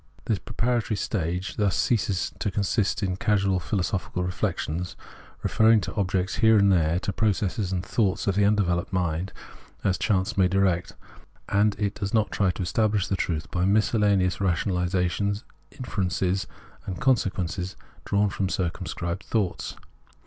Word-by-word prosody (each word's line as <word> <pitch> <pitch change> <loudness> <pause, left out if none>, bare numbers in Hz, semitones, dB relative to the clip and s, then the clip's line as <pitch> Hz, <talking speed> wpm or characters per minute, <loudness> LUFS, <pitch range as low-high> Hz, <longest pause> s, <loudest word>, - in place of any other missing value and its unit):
This 105 -4 0
preparatory 115 -1 -1
stage 90 -2 -2
thus 100 -3 +2
ceases 100 -7 0
to 105 - 0
consist 100 +1 0
of 95 -1 -1
casual 100 -3 +2
philosophical 90 -1 -2
reflections, 90 -1 -2 0.5
referring 110 0 +5
to - - -5
objects 95 -2 -1
here 110 -1 +5
and 100 -1 +5
there, 85 -2 +3
to 100 - -2
pro 110 +3 +2
cesses 95 0 -2
and 90 -1 -2
thoughts 100 -4 0
of 100 - +2
the 100 +2 +2
undeveloped 100 -3 +1
mind 90 0 -1 0.5
as 95 - +1
chance 95 -3 +1
may 95 - +5
direct; 95 -1 +1 0.6
and 100 +1 +3
it 100 -2 -1
does 100 +1 -3
not 110 -1 +2
try 100 -2 +2
to 90 - -2
estabhsh 105 +1 +1
the 100 - +1
truth 80 -4 -2
by 90 - 0
miscellaneous 100 -2 +2
ratiocinations, 90 +2 0 0.3
inferences, 95 -4 -1 0.4
and 90 -2 -4
con 130 +3 +5
sequences 95 -3 -3 0.3
drawn 100 0 +2
from 95 - -1
circimiscribed 85 0 -3
thoughts. 100 -3 -2
95 Hz, 150 wpm, -26 LUFS, 90-105 Hz, 0.6 s, referring